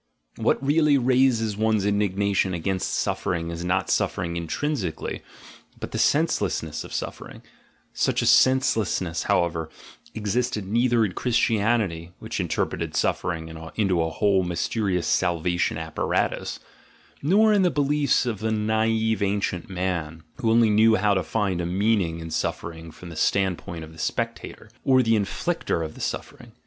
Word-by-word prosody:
What 135 - +1
really 150 0 +4
raises 125 -4 +2
one's 110 -1 +1
indignation 100 -2 +1
against 95 +2 -2
suffering 85 -1 -1
is 85 +1 -5
not 90 +2 0
suffering 85 0 0
intrinsically, 85 - -3 0.6
but - - -6
the - - -3
senselessness - - +1
of - - -11
suffer - - -5
ing; - - -13 0.5
such - - +1
a - - 0
senselessness, 110 - +3
however, 80 -2 +1 0.5
existed 110 0 -1
neither 115 +2 +2
in 100 - -3
Christianity, 105 -6 0
which 110 0 -5
interpreted 90 -4 -2
suffering 85 -2 -1 0.3
into 95 -6 +1
a 80 - 0
whole 100 +3 +2
mys 90 -1 -2
terious 100 -6 0
salvation 85 -1 0
apparatus, 80 -1 -2 0.6
nor 210 +8 +4
in 205 - +4
the 180 - +4
beliefs 145 -3 +1
of 115 -5 -2
the 110 +1 -1
naive 110 +1 +1
ancient 100 -3 -1
man, 85 -4 -3
who 120 -5 0
only 115 -1 +4
knew 110 +1 +5
how 105 +1 +2
to 95 - +1
find 95 -1 -1
a - - -2
meaning 95 -3 +1
in 80 0 -7
suffering 80 +1 -3
from 85 +2 -11
the 85 - -9
standpoint 90 -1 0
of 80 - -11
the 80 - -14
spectator, 115 +2 -4
or 130 -1 +4
the 115 -1 +3
in 105 -2 +1
flictor 165 - -2
of 80 - -8
the - - -11
suffering. - - -5
100 Hz, 150 wpm, -24 LUFS, 85-115 Hz, 0.6 s, knew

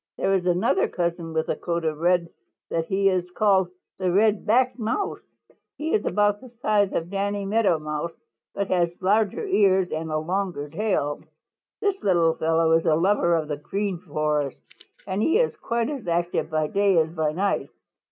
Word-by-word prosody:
There 195 - +1
is 185 -2 0
another 185 +2 +2
cousin 170 -1 -3
with 160 0 -1
a - - 0
coat 170 -1 -3
so 160 -1 0
red 170 +2 +1 0.4
that 165 -1 0
he 195 0 +1
is 180 -2 +1
called 190 -2 +2 0.3
the 185 -1 +1
Red 210 +2 +2
backed 255 +3 +2
Mouse. 230 - -2 0.6
He 315 +2 -2
is 210 - +2
about 205 0 +1
the 255 - -12
size 205 -4 +2
of 170 +2 -2
Danny 200 0 -2
Meadow 200 -4 +2
Mouse 155 +2 -4 0.4
but 200 -1 -2
has 175 -2 +2
larger 210 - +1
ears 190 - +3
and 160 +1 -3
a 155 - 0
longer 175 -2 -2
tail. 165 -8 -1 0.6
"This 400 -1 0
little 170 -4 +3
fellow 160 0 +1
is 165 0 +3
a 155 - +4
lover 175 0 +2
of 160 -2 -1
the 150 -1 -3
Green 195 +4 -3
Forest, 150 -4 -2 0.5
and 190 +1 -2
he 325 - +3
is 485 0 +1
quite 235 +3 -1
as 270 -10 -6
active 170 -1 0
by 155 -1 0
day 195 +3 +2
as 160 0 +2
by 160 -3 0
night. 195 +5 -1
185 Hz, 180 wpm, -24 LUFS, 165-205 Hz, 0.6 s, a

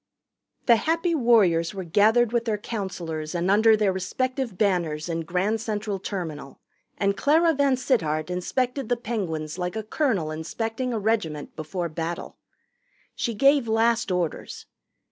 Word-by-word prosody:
The 235 -2 +6
Happy 330 +7 0
Warriors 205 - +3
were 190 - -4
gathered 220 +7 +3
with 235 -1 +1
their 220 -2 0
counselors 180 -7 -5
and 175 +2 +1
under 220 +2 +5
their 205 -3 +2
respective 255 +4 -2
banners 175 -7 0
in 165 -1 -2
Grand 185 +6 -1
Central 210 -3 -3
Terminal, 160 -8 -6 0.4
and 200 0 +1
Clara 325 +6 +3
VanSittart 255 - +1
inspected 250 +8 -2
the 245 - +2
Penguins 180 -9 -4
like 180 +2 -3
a 220 - -3
colonel 215 - 0
inspecting 225 +10 -3
a 230 - -1
regiment 200 -9 -1
before 170 +3 -3
battle. 165 +1 -5 0.7
She 235 - -2
gave 275 +2 +4
last 225 0 +2
orders. 180 -3 -3
205 Hz, 140 wpm, -25 LUFS, 170-235 Hz, 0.7 s, The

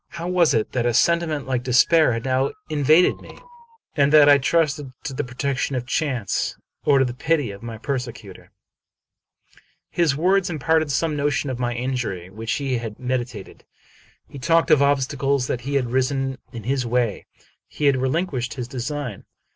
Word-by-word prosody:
How 170 0 -5
was 175 -6 +3
it 110 - 0
that 120 -1 0
a 120 - 0
sentiment 165 -4 +2
like 130 -2 -1
despair 130 +4 +4
had 115 +1 -4
now 130 +1 0 0.2
invaded 155 +4 +4
me, - - -13 0.6
and 140 -1 +3
that 150 -1 +7
I 145 -1 +7
trusted 150 -1 0
to 135 - -5
the 140 - -2
protection 135 +1 -2
of 125 -1 -3
chance, 125 - -1 0.3
or 140 - +4
to 135 - +4
the 120 - -3
pity 140 -2 0
of 100 0 -11
my 115 -1 -7
persecutor? 120 -6 -6 1.4
His 165 -5 +2
words 185 +4 +2
imparted 160 -1 +1
some 155 +2 0
notion 145 -1 -1
of 125 - -5
the 120 -1 -1
injury 120 -8 -3
which 110 +2 -4
he 135 -4 -1
had 115 -2 -7
meditated. 125 -5 -4 0.6
He 140 - -10
talked 165 +4 +2
of 150 -2 +6
obstacles 140 -1 +1
that 125 - -3
had 135 -2 -1
risen 135 0 0
in 115 -2 -8
his 130 +3 0
way. 120 -3 -1 0.4
He 150 - -4
had 140 -2 +4
relinquished 130 -2 -1
his 125 -3 -5
design. 130 -2 -5
135 Hz, 170 wpm, -22 LUFS, 125-150 Hz, 1.4 s, that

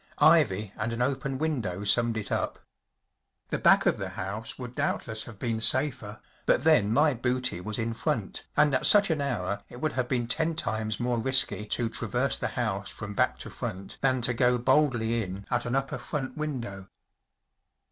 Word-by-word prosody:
Ivy 100 +1 +4
and 110 +2 -2
an 120 +1 0
open 135 0 -1
window 120 - -2
summed 115 +2 +2
it 105 - -4
up. - - -1 0.9
The - - -1
back - - +5
of - - +2
the - - -3
house 100 +4 -5
would 125 -2 -7
doubtless 110 -3 -1
have 115 -4 -11
been 115 0 -2
safer, 120 -5 +2 0.3
but - - +3
then 155 -10 +4
my 145 +5 +4
booty 125 -5 -1
was 105 +3 -3
in 115 0 -2
front, 115 -3 -3
and 150 -2 +4
at 130 - +3
such 205 -4 +5
an 155 -2 0
hour 100 -7 -2
Lt 120 - -10
would 155 +2 -1
have 130 -1 -1
been 120 -2 0
ten 160 +7 +1
times 110 -5 -2
more 120 -1 0
risky 130 -3 +1
to 120 +2 0
traverse 120 +4 -1
the - - -2
house 100 -5 -1
from 105 -1 -7
back - - +1
to - - -8
front 95 +1 -6
than 130 -2 +2
to 120 - +1
go 125 +1 +3
boldly 120 -3 +2
in 95 0 -6
at 120 -1 0
an 120 - -1
upper 135 0 -1
front 130 +2 -4
window*. 120 - -5
120 Hz, 190 wpm, -28 LUFS, 110-130 Hz, 0.9 s, back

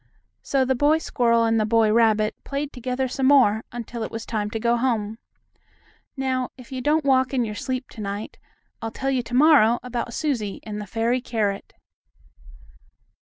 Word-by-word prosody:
So 270 -2 +1
the 265 - +2
boy 290 +5 +3
squirrel 235 -6 +1
and 225 0 +2
the 215 - +2
boy 220 -1 +3
rabbit 220 -2 +3
played 280 +1 -4
together 255 +1 -2
some 260 +1 0
more, 245 -6 +5
until 240 0 -6
it 220 - -3
was 225 0 -6
time 210 -2 -2
to 225 - -4
go 235 +1 +2
home. 225 -3 -1 1.0
Now, 260 -1 -1
if 250 -1 -14
you 260 -1 -4
don't 300 +3 +1
walk 260 0 +2
in 245 -2 +1
your 210 - -5
sleep 255 +4 -4
to 220 - -9
night, 205 +1 -5 0.4
I'll 225 - -3
tell 270 +4 -3
you 260 -2 +1
to 240 +1 -6
morrow 265 -5 +6
about 245 -1 -4
Susie 240 -10 -2
and 210 -1 -5
the 205 - -8
fairy 230 +5 0
carrot. 210 -5 -2
240 Hz, 180 wpm, -23 LUFS, 220-260 Hz, 1.0 s, morrow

